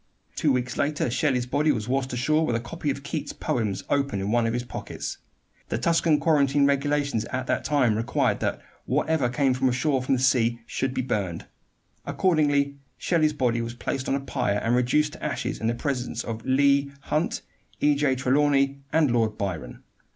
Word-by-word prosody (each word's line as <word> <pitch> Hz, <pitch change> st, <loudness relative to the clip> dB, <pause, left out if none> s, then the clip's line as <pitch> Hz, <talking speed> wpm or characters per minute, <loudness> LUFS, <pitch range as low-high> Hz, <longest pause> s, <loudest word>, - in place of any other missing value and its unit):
Two 150 Hz, -, +2 dB
weeks 125 Hz, -1 st, -1 dB
later 145 Hz, -4 st, 0 dB
Shelley's 125 Hz, -1 st, +1 dB
body 145 Hz, +4 st, +2 dB
was 110 Hz, -5 st, -2 dB
washed 130 Hz, +1 st, -1 dB
ashore 155 Hz, +6 st, +1 dB
with 120 Hz, -6 st, 0 dB
a -, -, +1 dB
copy 145 Hz, +6 st, -4 dB
of 140 Hz, 0 st, -3 dB
Keats' 150 Hz, +2 st, -4 dB
poems 105 Hz, -5 st, -2 dB
open 140 Hz, -7 st, 0 dB
in 100 Hz, +2 st, -2 dB
one 120 Hz, -1 st, +2 dB
of 115 Hz, -, -1 dB
his 120 Hz, 0 st, -1 dB
pockets. 120 Hz, -, -6 dB, 0.5 s
The -, -, -1 dB
Tuscan 165 Hz, -2 st, +2 dB
quarantine 145 Hz, -3 st, +3 dB
regulations 140 Hz, -3 st, +1 dB
at 130 Hz, +1 st, -3 dB
that -, -, -1 dB
time 130 Hz, -7 st, +2 dB
required 115 Hz, +3 st, 0 dB
that -, -, -1 dB, 0.3 s
whatever 155 Hz, -6 st, +1 dB
came 135 Hz, 0 st, +2 dB, 0.2 s
ashore 130 Hz, +2 st, +1 dB
from 130 Hz, +1 st, +1 dB
the -, -, -1 dB
sea 120 Hz, -3 st, +2 dB
should 130 Hz, +2 st, -2 dB
be 130 Hz, -, 0 dB
burned. 95 Hz, -9 st, -2 dB, 0.6 s
Accordingly 145 Hz, -5 st, +1 dB, 0.2 s
Shelley's 155 Hz, -3 st, +2 dB
body 120 Hz, -5 st, 0 dB
was 115 Hz, +1 st, -5 dB
placed 130 Hz, +2 st, -3 dB
on -, -, +2 dB
a -, -, 0 dB
pyre 105 Hz, -6 st, -1 dB
and 115 Hz, +2 st, +2 dB
reduced 150 Hz, +5 st, +2 dB
to -, -, -11 dB
ashes 140 Hz, -5 st, -2 dB
in 110 Hz, -, 0 dB
the 115 Hz, -, +1 dB
presence 125 Hz, -3 st, -3 dB
of 115 Hz, 0 st, -5 dB
Leigh 140 Hz, +1 st, +3 dB
Hunt, 155 Hz, +4 st, -1 dB, 0.4 s
E. 145 Hz, 0 st, +4 dB
J. 140 Hz, -2 st, +1 dB
Trelawney, 140 Hz, +1 st, +2 dB
and 155 Hz, -5 st, +3 dB
Lord 115 Hz, -3 st, +1 dB
Byron. 85 Hz, -11 st, -5 dB
130 Hz, 185 wpm, -25 LUFS, 120-145 Hz, 0.6 s, E